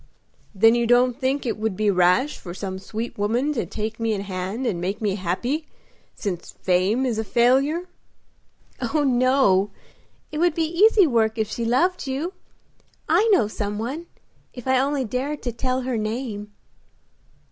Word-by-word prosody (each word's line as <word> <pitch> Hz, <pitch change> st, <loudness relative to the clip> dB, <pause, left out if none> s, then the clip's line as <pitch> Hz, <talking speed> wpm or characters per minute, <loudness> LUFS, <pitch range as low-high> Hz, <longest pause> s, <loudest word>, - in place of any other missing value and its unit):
"Then 225 Hz, +3 st, +6 dB
you 235 Hz, -1 st, +1 dB
don't 245 Hz, +1 st, +3 dB
think 270 Hz, +1 st, 0 dB
it 225 Hz, -3 st, -2 dB
would 215 Hz, -3 st, -2 dB
be 215 Hz, -1 st, +2 dB
rash 185 Hz, +10 st, +2 dB
for 175 Hz, -1 st, -8 dB
some 190 Hz, -1 st, -5 dB
sweet 220 Hz, +3 st, -6 dB
woman 240 Hz, +8 st, +1 dB
to 245 Hz, -, -2 dB
take 220 Hz, +1 st, -4 dB
me 225 Hz, -1 st, 0 dB
in 200 Hz, -, -2 dB
hand 195 Hz, +5 st, -4 dB
and 180 Hz, -8 st, -1 dB
make 195 Hz, +4 st, -2 dB
me 210 Hz, -4 st, 0 dB
happy, 210 Hz, -, -2 dB, 0.5 s
since 180 Hz, -5 st, -4 dB
fame 190 Hz, +8 st, +2 dB
is 235 Hz, -4 st, -1 dB
a -, -, 0 dB
failure?" 270 Hz, -, +2 dB, 0.9 s
"Oh, 305 Hz, -2 st, 0 dB
no; 255 Hz, -7 st, +3 dB, 0.6 s
it 305 Hz, -, -4 dB
would 345 Hz, -1 st, +2 dB
be 330 Hz, -, +1 dB
easy 390 Hz, +5 st, +5 dB
work 225 Hz, -5 st, +1 dB
if 220 Hz, -1 st, 0 dB
she 235 Hz, -, -3 dB
loved 340 Hz, +8 st, +1 dB
you. 290 Hz, +8 st, -3 dB, 0.7 s
I 450 Hz, -, +3 dB
know 370 Hz, -, +4 dB
some 205 Hz, -1 st, -4 dB
one 270 Hz, +10 st, -4 dB, 0.5 s
if 245 Hz, 0 st, -9 dB
I 260 Hz, 0 st, +4 dB
only 275 Hz, 0 st, 0 dB
dared 265 Hz, +6 st, -3 dB
to 245 Hz, -, -2 dB
tell 255 Hz, +2 st, -1 dB
her 250 Hz, -2 st, -2 dB
name." 215 Hz, -1 st, -4 dB
235 Hz, 170 wpm, -23 LUFS, 210-270 Hz, 0.9 s, Then